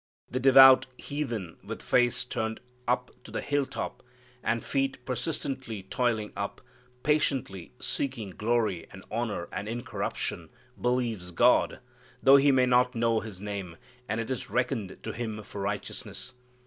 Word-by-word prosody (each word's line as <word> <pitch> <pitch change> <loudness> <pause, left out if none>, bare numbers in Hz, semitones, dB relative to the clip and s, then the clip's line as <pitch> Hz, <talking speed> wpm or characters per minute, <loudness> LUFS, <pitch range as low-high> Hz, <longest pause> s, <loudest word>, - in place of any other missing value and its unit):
The 130 - 0
devout 135 0 +8
heathen 120 - -4
with - - -7
face 120 -1 +3
turned 110 -2 -3 0.3
up 125 +1 +1
to - - -12
the - - -3
hill 145 -1 0
top, - - -5 0.4
and 115 0 0
feet 135 0 0
persistently 130 -4 -3
toiling 110 0 -1
up, - - -4 0.4
patiently 135 - 0
seeking 120 -8 -2
glory 110 -4 0
and 95 0 -11
honor 110 -6 -2
and 105 - -4
incorruption 120 +1 -3 0.3
believes 120 -7 0
God, 120 +10 +3 0.4
though 135 +1 +9
he 140 +1 +5
may 130 -1 +4
not 125 0 +3
know 115 -1 +2
His 105 -5 -8
name, 100 -5 -5 0.3
and 105 +2 0
it 115 +3 -3
is 130 - -3
reckoned 120 -6 -1
to - - -3
him 110 -2 -4
for 100 - -7
righteousness. 100 +5 -4
120 Hz, 145 wpm, -29 LUFS, 105-130 Hz, 0.4 s, though